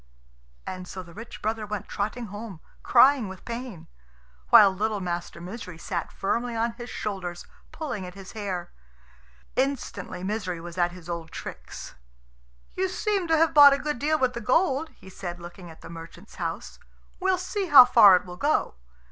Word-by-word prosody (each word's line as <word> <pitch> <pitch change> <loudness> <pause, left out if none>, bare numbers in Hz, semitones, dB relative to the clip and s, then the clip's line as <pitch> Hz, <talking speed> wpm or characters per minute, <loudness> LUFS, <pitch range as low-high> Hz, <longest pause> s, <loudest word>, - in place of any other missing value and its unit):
And 185 -1 -6
so 185 +1 -7
the 170 -1 -15
rich 225 +5 -10
brother 220 +1 -1
went 210 -1 -5
trotting 215 +4 -3
home, 205 -5 -7 0.2
crying 255 -2 +5
with 190 -1 -11
pain; 235 -6 -6 0.6
while 195 - +8
little 210 +2 -1
Master 175 -2 -4
Misery 180 -1 -8
sat 170 0 -4
firmly 235 +4 -2
on 230 +1 0
his 240 +1 -9
shoulders, 185 -4 -5 0.3
pulling 260 - -5
at 180 - -11
his 195 -1 -10
hair. 190 -5 -5 0.8
Instantly 240 -9 -2
Misery 190 -4 -3
was 170 0 -9
at 175 -1 +1
his 175 -2 -12
old 170 -2 -5
tricks. - - -8 0.8
"You 375 0 -1
seem 395 -1 -1
to 325 -1 +3
have 325 0 +3
bought 285 -1 +9
a - - +1
good 295 -2 -3
deal 310 +3 +2
with 255 -3 +1
the 235 - -5
gold," 285 - +1
he - - -16
said, 180 -2 -7
looking 175 +1 -10
at 160 - -14
the - - -10
merchant's 170 +4 -11
house. - - -5 0.4
"We'll 380 -1 +2
see 375 +2 -3
how 275 -6 +10
far 230 -6 +8
it 180 - 0
will 180 -1 -9
go." 300 +7 +1
210 Hz, 175 wpm, -26 LUFS, 180-260 Hz, 0.8 s, how